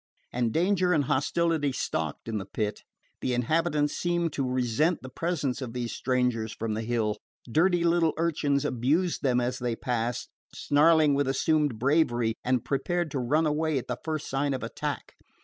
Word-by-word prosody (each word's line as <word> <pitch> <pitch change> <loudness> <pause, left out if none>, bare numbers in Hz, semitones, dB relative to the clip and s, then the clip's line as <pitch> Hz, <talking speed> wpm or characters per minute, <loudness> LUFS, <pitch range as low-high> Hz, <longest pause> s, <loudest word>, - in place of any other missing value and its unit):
And 120 -2 0
danger 180 - +2
and 150 -3 +3
hostility 150 +2 +1
stalked 80 - -3
in 110 -2 -2
the 95 - -6
Pit. 105 +1 -3 0.4
The 125 - -1
inhabitants 150 +4 +1
seemed 175 -2 0
to 135 -2 -1
resent 130 +7 +1
the 130 - -8
presence 145 -5 -2
of 120 -3 -5
these 120 -2 -3
strangers 125 -3 0
from 115 -1 -3
the 110 - -2
Hill. 110 -2 -1 0.3
Dirty 170 +7 +2
little 170 -2 +3
urchins 150 -4 +1
abused 145 +8 +1
them 125 -3 +2
as 125 +1 -1
they 120 -2 -1
passed, 120 0 -2 0.3
snarling 155 0 +4
with 140 -1 +1
assumed 145 -1 +1
bravery, 120 -3 +2
and 125 -2 0
prepared 170 +3 -1
to 135 - -2
run 150 +6 +2
away 155 0 +1
at 130 - -3
the 125 - -3
first 155 -2 -3
sign 135 +1 0
of 130 - -5
attack. - - -4
140 Hz, 170 wpm, -27 LUFS, 120-160 Hz, 0.4 s, snarling